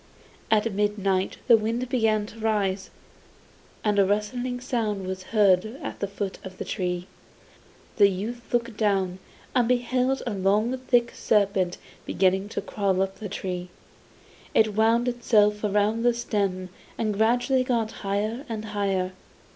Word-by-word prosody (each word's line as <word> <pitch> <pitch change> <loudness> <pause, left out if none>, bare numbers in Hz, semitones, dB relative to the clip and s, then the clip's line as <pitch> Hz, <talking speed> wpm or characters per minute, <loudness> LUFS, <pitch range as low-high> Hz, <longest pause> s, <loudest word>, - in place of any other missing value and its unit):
At 220 0 +2
midnight 195 -2 0
the 240 - +7
wind 230 +3 -2
began 220 -4 +1
to 220 +2 -12
rise, 200 -3 0 0.9
and 210 -1 +2
a - - +7
rustling 245 +5 -1
sound 225 -6 -2
was 185 0 -5
heard 195 -4 +4 0.2
at - - -6
the 200 - -1
foot 200 -1 -5
of 185 -1 -9
the - - -5
tree. 180 -2 -2 0.9
The 205 -2 +7
youth 225 +6 -5
looked 235 -2 0
down 190 -4 +1 0.3
and 245 -2 +3
beheld 250 +2 +1
a 240 - -2
long 205 +5 +2
thick 245 -2 +1
serpent 195 -4 +1 0.3
beginning 190 +1 +1
to - - -3
crawl 195 -3 0
up 195 0 -5
the 210 - -5
tree. 180 -2 -4 0.9
It 215 -1 +4
wound 225 +3 +3
itself 210 -4 +2
round 210 +2 +1
the 240 -1 +3
stem 200 -6 -1 0.3
and 215 -2 0
gradually 245 +5 +2
got 230 -3 0
higher 210 +5 -1
and 220 -1 -4
higher. 195 -2 0
210 Hz, 145 wpm, -26 LUFS, 195-235 Hz, 0.9 s, the